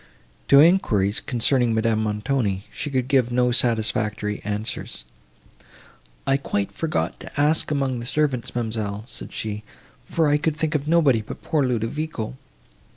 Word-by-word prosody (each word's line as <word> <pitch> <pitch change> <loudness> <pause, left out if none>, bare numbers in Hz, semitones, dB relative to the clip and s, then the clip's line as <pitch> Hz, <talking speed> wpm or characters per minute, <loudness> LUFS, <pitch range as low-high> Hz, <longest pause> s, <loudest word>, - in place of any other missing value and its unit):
To 140 - +7
enquiries, 115 - +4
concerning 120 -1 +1
Madame 110 -1 +1
Montoni, 105 -2 -1
she - - -4
could 130 -2 -1
give 130 -3 +2
no 125 0 +2
satisfactory 110 -3 0
answers. 105 - -3 1.2
"I 135 - +3
quite 100 -7 -2
forgot 155 +9 -2
to - - -8
ask 150 +2 +3
among 135 -4 0
the 120 - -5
servants, 140 -5 0
ma'amselle," 110 -3 -3
said - - -6
she, 105 -1 -4 0.5
"for 160 -2 +1
I 145 0 +4
could 160 -1 0
think 155 0 -1
of 150 -1 -1
nobody 155 -8 +4
but 105 - -9
poor 155 -3 +1
Ludovico." 125 +1 -3
125 Hz, 145 wpm, -23 LUFS, 110-145 Hz, 1.2 s, To